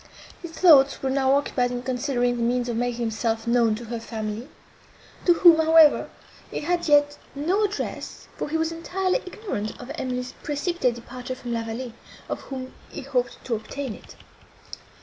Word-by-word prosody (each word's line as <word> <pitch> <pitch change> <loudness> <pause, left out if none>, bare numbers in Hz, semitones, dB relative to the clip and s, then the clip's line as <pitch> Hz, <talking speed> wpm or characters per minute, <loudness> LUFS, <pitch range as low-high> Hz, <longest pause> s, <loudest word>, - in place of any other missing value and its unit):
His 340 -2 -8
thoughts 285 -7 +5
were 265 - 0
now 265 0 +3
occupied 260 -3 +1
in 245 0 -4
considering 250 -1 0
the 240 - -3
means 245 +1 +1
of 240 - -2
making 240 0 -1
himself 225 0 -1
known 235 -2 +3
to 235 +2 -8
her 235 +1 -4
family, 225 +2 -5 0.8
to 350 - +6
whom, 340 -1 +7
however, 320 -1 +5 0.4
he - - -4
had 345 +3 -1
yet 290 -1 +4 0.2
no 360 +9 +1
address, 410 +1 -5
for - - -4
he 320 - 0
was 320 0 0
entirely 370 +6 -1
ignorant 365 - -5
of 245 +2 -8
Emily's 250 -3 -4
precipitate 295 -4 -1
departure 250 +2 -7
from 245 -2 -5
La 230 - -1
Vallée, 225 +2 -5 0.4
of - - -3
whom 260 -1 -6 0.2
he - - -7
hoped 255 -2 -2
to 245 - -2
obtain 235 +3 -4
it. - - -14
255 Hz, 170 wpm, -25 LUFS, 240-315 Hz, 0.8 s, whom